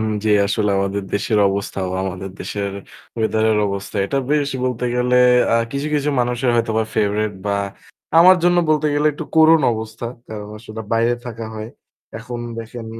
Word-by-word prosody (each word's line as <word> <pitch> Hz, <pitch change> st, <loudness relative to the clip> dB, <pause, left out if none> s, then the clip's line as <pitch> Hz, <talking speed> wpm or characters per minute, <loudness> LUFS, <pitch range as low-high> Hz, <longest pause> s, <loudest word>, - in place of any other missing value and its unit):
এখন -, -, 0 dB, 0.2 s
যে 110 Hz, -, +2 dB, 0.2 s
আসলে 105 Hz, 0 st, 0 dB
আমাদের 100 Hz, +1 st, -1 dB
দেশের 105 Hz, +1 st, +1 dB
অবস্থা 100 Hz, 0 st, -3 dB
বা 95 Hz, -, -3 dB
আমাদের 95 Hz, 0 st, -5 dB
দেশের 100 Hz, -1 st, -3 dB, 0.5 s
weather 110 Hz, 0 st, +1 dB
এর 105 Hz, -, +1 dB
অবস্থা 100 Hz, +1 st, -5 dB
এটা 140 Hz, -, -1 dB
বেশ 145 Hz, -1 st, +1 dB
বলতে 125 Hz, -1 st, -2 dB
গেলে 125 Hz, 0 st, +2 dB, 0.4 s
আ -, -, +4 dB, 0.2 s
কিছু, 140 Hz, +2 st, -2 dB
কিছু 145 Hz, 0 st, 0 dB
মানুষের 120 Hz, +1 st, 0 dB
হয়তোবা 110 Hz, -1 st, +1 dB
favorite 105 Hz, -1 st, 0 dB
বা 100 Hz, 0 st, +1 dB, 0.6 s
আমার 185 Hz, +2 st, +8 dB
জন্য 175 Hz, 0 st, +4 dB
বলতে 155 Hz, 0 st, +2 dB
গেলে 145 Hz, +1 st, +2 dB
একটু 155 Hz, +3 st, -6 dB
করুণ 160 Hz, 0 st, +7 dB
অবস্থা। 110 Hz, +1 st, -5 dB, 0.2 s
কারণ 105 Hz, -1 st, -7 dB
আসলে 110 Hz, 0 st, -9 dB
বাইরে 115 Hz, +1 st, +2 dB
থাকা 115 Hz, -1 st, -6 dB
হয়। 110 Hz, 0 st, -6 dB, 0.5 s
এখন 120 Hz, +1 st, -7 dB, 0.2 s
দেখেন 115 Hz, 0 st, -7 dB
115 Hz, 170 wpm, -20 LUFS, 105-125 Hz, 0.6 s, আমার